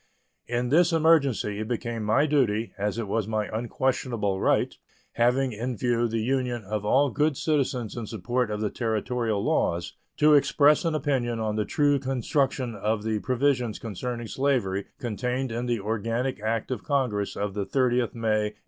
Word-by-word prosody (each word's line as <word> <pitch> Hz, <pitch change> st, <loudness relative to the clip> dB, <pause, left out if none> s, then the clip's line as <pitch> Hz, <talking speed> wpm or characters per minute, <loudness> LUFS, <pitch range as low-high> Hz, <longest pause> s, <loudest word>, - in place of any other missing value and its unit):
In 120 Hz, +1 st, -1 dB
this 170 Hz, +5 st, +4 dB
emergency 145 Hz, -10 st, +3 dB
it 110 Hz, -, -3 dB
became 120 Hz, -1 st, -3 dB
my 110 Hz, +8 st, +3 dB
duty, 120 Hz, -7 st, +1 dB
as 105 Hz, +2 st, -2 dB
it 115 Hz, -3 st, -3 dB
was 105 Hz, +1 st, -1 dB
my 110 Hz, -1 st, -1 dB
unquestionable 115 Hz, -4 st, -1 dB
right, -, -, +2 dB, 0.4 s
having 125 Hz, +3 st, +2 dB
in 120 Hz, +2 st, -4 dB
view 120 Hz, 0 st, +1 dB
the 115 Hz, -1 st, -2 dB
union 125 Hz, -2 st, -1 dB
of 105 Hz, +1 st, -3 dB
all 135 Hz, +6 st, +3 dB
good 150 Hz, -2 st, +1 dB
citizens 130 Hz, -7 st, -1 dB
in 115 Hz, -3 st, -5 dB
support 120 Hz, +4 st, -1 dB
of 105 Hz, 0 st, -3 dB
the 105 Hz, -, -1 dB
Territorial 110 Hz, -1 st, -1 dB
laws, 85 Hz, 0 st, 0 dB, 0.2 s
to 150 Hz, 0 st, +5 dB
express 145 Hz, +2 st, +4 dB
an 165 Hz, -2 st, +1 dB
opinion 130 Hz, -6 st, 0 dB
on 110 Hz, -1 st, -1 dB
the 105 Hz, -1 st, 0 dB
true 145 Hz, +6 st, +2 dB
construction 130 Hz, -1 st, -1 dB
of 105 Hz, 0 st, -1 dB
the 110 Hz, -1 st, -1 dB
provisions 125 Hz, -2 st, 0 dB
concerning 120 Hz, +2 st, -5 dB
slavery 115 Hz, -7 st, 0 dB
contained 125 Hz, +2 st, -2 dB
in 120 Hz, +2 st, -3 dB
the 120 Hz, -2 st, 0 dB
organic 115 Hz, +4 st, -2 dB
act 110 Hz, +3 st, -2 dB
of 125 Hz, -, -3 dB
Congress 125 Hz, -8 st, 0 dB
of 100 Hz, -1 st, -2 dB
the 105 Hz, -, -2 dB
30th 125 Hz, +1 st, +1 dB
May, 110 Hz, -2 st, 0 dB
1854. -, -, -34 dB
120 Hz, 170 wpm, -26 LUFS, 110-130 Hz, 0.4 s, to